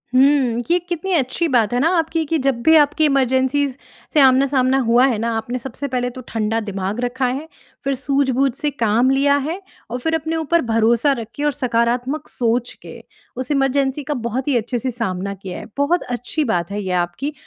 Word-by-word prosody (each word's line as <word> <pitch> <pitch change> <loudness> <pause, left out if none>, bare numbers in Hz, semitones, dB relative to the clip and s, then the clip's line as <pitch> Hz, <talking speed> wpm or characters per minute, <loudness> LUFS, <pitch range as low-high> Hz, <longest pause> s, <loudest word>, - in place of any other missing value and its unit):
हुँ, 260 -3 +4
ये 350 - +5
कितनी 350 +2 -4
अच्छी 315 +2 0
बात 240 -5 +2
है 245 - +1
ना 310 +6 +3
आपकी 325 0 0
कि 320 +2 0
जब 255 -4 +1
भी 320 +5 +5
आपकी 300 +1 +4
इमरजेंसीज़ 265 0 +1 0.4
से 310 - +4
आमना-सामना 265 0 +4
हुआ 240 +2 +5
है 245 -5 0
ना। 230 +2 -1
आपने 235 +3 -3
सबसे 270 +3 -5
पहले 250 -1 -1
तो 255 +1 -9
ठंडा 225 0 -1
दिमाग 200 +1 -4
रखा 250 +1 -1
है, 275 +6 -3 0.4
फ़िर 275 0 0
सूझ-बूझ 275 0 +1
से 295 +1 -1
काम 235 -1 +2
लिया 280 +1 +3
है। 345 +6 -4 0.3
और 245 - -3
फ़िर 320 +5 0
अपने 320 +1 -2
ऊपर 325 +1 +1
भरोसा 230 +5 +3
रख 225 - -6
के 290 - -4
और 295 - +2
सकारात्मक 245 +2 -1
सोच 240 0 -1
के, - - -10 0.4
उस 255 +2 -4
इमरजेंसी 275 0 +1
का 295 - -2
बहुत 255 +4 -3
ही 270 - +3
अच्छे 240 +2 -2
से 255 +2 -2
सामना 200 -5 -3
किया 190 -2 -8
है। - - -9
बहुत 295 +5 +1
अच्छी 245 +5 -3
बात 175 0 -1
है 205 +1 -3
ये 185 - -3
आपकी 275 - -6
260 Hz, 205 wpm, -20 LUFS, 235-285 Hz, 0.4 s, ये